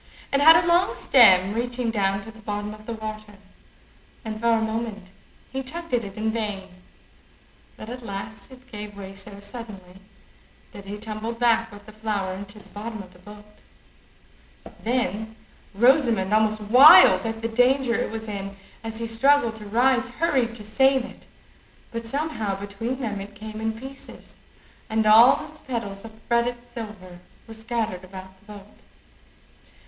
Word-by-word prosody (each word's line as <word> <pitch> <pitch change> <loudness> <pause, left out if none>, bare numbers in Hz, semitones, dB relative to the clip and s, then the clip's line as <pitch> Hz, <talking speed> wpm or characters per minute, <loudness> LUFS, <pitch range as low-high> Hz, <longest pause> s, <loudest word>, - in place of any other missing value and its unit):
It 275 - +3
had 320 +3 +9
a 335 +1 +4
long 350 +2 +3
stem, 195 -6 +5
reaching 240 0 -2
down 195 -2 0
to 225 +3 -10
the 220 0 -16
bottom 210 0 -4
of 215 0 -14
the 230 - -3
water, 215 -1 -7 0.9
and 215 -1 -5
for 235 0 +3
a 225 - +3
moment 220 -4 -4 0.4
he 265 - -3
tugged 335 +4 -8
at 240 -1 +2
it 200 -1 -8
in 220 +1 -1
vain, 210 -4 -4 1.1
but 215 - -9
at 250 +2 -7
last 200 +2 -7
it 260 0 -16
gave 210 -1 -8
way 195 -1 -8
so 195 +1 -9
suddenly, 200 -4 -10 0.7
that 200 - -11
he 205 +1 -6
tumbled 220 +2 -5
back 230 -1 +2
with 205 0 -13
the 215 - -12
flower 210 -3 -3
into 200 +2 -8
the 210 - -16
bottom 220 0 -7
of 185 -1 -17
the 180 - -19
boat. 210 +2 -15 1.2
Then 220 -2 -2 0.4
Rosamond, 235 -4 +3
almost 215 0 +2
wild 230 - +8
at 225 0 -5
the - - +1
danger 250 +2 +2
it - - -1
was 220 0 -6
in 200 -1 -6 0.3
as 225 0 -5
he 230 - -3
struggled 235 +1 +2
to 210 -1 -9
rise, 250 +3 +2
hurried 255 -4 0
to 215 - -9
save 265 +4 +2
it, - - -14 0.6
but 230 -1 -6
somehow 225 -8 -2
between 225 +6 -5
them 210 -5 -3
it 205 +1 -10
came 215 +1 -8
in 225 0 -3
pieces, 270 +2 -12 0.5
and 220 0 +1
all 225 +4 +6
its 310 0 -15
petals 215 -6 -5
of 220 -1 -12
fretted 235 +1 +1 0.2
silver 205 -6 -9 0.3
were 225 - -11
scattered 220 -4 -3
about 190 0 -11
the - - -27
boat. 205 0 -13
220 Hz, 165 wpm, -24 LUFS, 205-240 Hz, 1.2 s, had